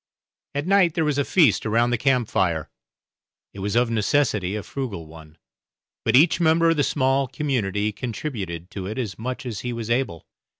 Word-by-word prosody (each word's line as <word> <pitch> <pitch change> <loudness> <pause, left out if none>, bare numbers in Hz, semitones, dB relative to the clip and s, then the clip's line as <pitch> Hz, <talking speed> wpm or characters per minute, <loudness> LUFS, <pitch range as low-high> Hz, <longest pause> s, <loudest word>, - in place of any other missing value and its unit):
At 145 +1 -1
night 185 -3 +3
there 160 - +1
was 145 -2 0
a - - +3
feast 140 - +3
around 115 +2 +2
the - - +3
camp 125 -4 +2
fire; 85 -7 0 0.8
it 100 - -9
was 100 +3 -2
of 120 0 +2
necessity 110 -4 +1
a 105 - -4
frugal 115 -12 -5
one, 80 0 -14 0.7
but - - +2
each 160 +6 +5
member 165 0 +4
of 165 - 0
the 145 - +3
small 135 -1 +1
community 110 -8 -1
contributed 105 - -5
to 95 -4 -5
it 110 - -5
as 110 -7 -4
much 130 +4 -4
as 115 -5 -4
he 125 - -4
was 115 -1 -4
able. 120 -10 -1
120 Hz, 185 wpm, -23 LUFS, 100-140 Hz, 0.8 s, each